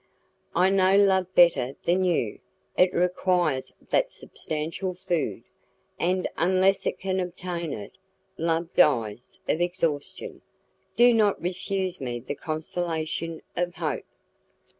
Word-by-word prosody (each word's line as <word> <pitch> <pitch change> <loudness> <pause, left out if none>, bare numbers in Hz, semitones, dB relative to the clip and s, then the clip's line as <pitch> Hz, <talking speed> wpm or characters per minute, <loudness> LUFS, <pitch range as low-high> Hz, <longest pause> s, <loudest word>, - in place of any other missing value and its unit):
"I 185 +2 +4
know 195 0 +4
love 190 -2 +3
better 165 -7 +5
than 180 +2 +3
you; 160 - 0 0.4
it 180 0 +4
requires 175 -5 +1 0.2
that - - +2
substantial 165 +4 -4
food, 175 - -2 0.6
and 180 +1 +1
unless 185 +2 +3
it - - -1
can 190 0 -1
obtain 175 -2 -4
it, 100 - -7 0.4
love 165 0 -1
dies 120 -8 +2
of 160 - +1
exhaustion. 170 -5 -2 0.5
Do 240 0 +6
not 215 -3 +3
refuse 185 0 -2
me 120 -2 -3
the 130 +4 -5
consolation 160 +1 -3
of 175 0 -1
hope." 160 -3 -3
175 Hz, 120 wpm, -26 LUFS, 155-185 Hz, 0.6 s, Do